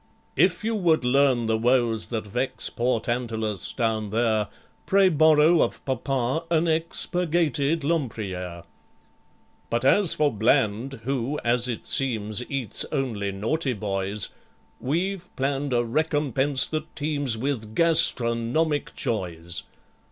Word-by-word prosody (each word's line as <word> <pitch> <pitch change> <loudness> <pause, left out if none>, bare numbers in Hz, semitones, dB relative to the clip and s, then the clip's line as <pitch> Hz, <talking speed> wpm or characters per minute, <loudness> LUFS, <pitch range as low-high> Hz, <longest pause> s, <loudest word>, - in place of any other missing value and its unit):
("If - - +2
you 225 +1 -1
would 170 - +1
learn 130 -2 +3
the 110 0 0
woes 120 -2 +1
that 110 -3 -4
vex 125 +6 -2
Poor 120 -1 0
TANTALUS, 110 -5 -2
down 110 -3 -1
there, 110 -1 +1 0.4
Pray 195 -1 +4
borrow 155 +1 +4
of - - -2
Papa 130 +2 -1
an 170 0 +2
ex 165 +1 0
Purgated 165 -3 0
LEMPRIERE.) 100 - -3 1.1
"But 120 +2 -1
as 185 +5 +4
for 150 -3 +1
BLAND 115 +3 0
who, 135 +3 -2
as 120 +1 +1
it 120 -3 -5
seems, 110 -4 -1
Eats 135 -7 -2
only 110 -7 -2
naughty 125 +8 -1
boys, 100 -1 -3 0.5
We've 180 +6 -2
planned 135 +1 -2
a 120 -1 +1
recompense 145 0 0
that 155 -1 -5
teems 145 -5 -2
With 110 -4 -4
gastronomic 150 -2 +4
joys. 85 -8 -3
130 Hz, 120 wpm, -24 LUFS, 110-150 Hz, 1.1 s, Pray